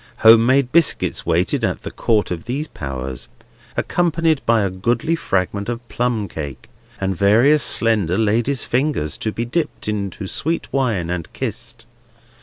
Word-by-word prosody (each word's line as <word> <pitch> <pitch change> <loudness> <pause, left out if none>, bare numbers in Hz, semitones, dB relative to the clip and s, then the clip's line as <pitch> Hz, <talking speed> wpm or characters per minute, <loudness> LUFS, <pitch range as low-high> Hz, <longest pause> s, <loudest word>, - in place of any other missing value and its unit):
Home 115 +1 +8
made 130 -1 +3
biscuits 165 -2 +1
waited - - +1
at - - -1
the - - -6
Court 110 -4 0
of 85 -2 -4
these 140 +6 -3
Powers, 65 - -6 0.5
accompanied 165 -3 +1
by 115 -1 +4
a 95 - -1
goodly 120 - 0
fragment 100 - -2
of 120 0 -5
plum 120 -4 -1
cake, 75 -6 -8 0.3
and 95 0 -1
various 115 - +4
slender 105 -8 +3
ladies' 115 +5 +1
fingers, 125 - 0
to 110 - -2
be 115 +2 -3
dipped 150 +1 -3
into 100 -2 -3
sweet 165 - -2
wine 110 -11 0
and 85 -2 -4
kissed. - - -5
115 Hz, 150 wpm, -20 LUFS, 95-135 Hz, 0.5 s, Home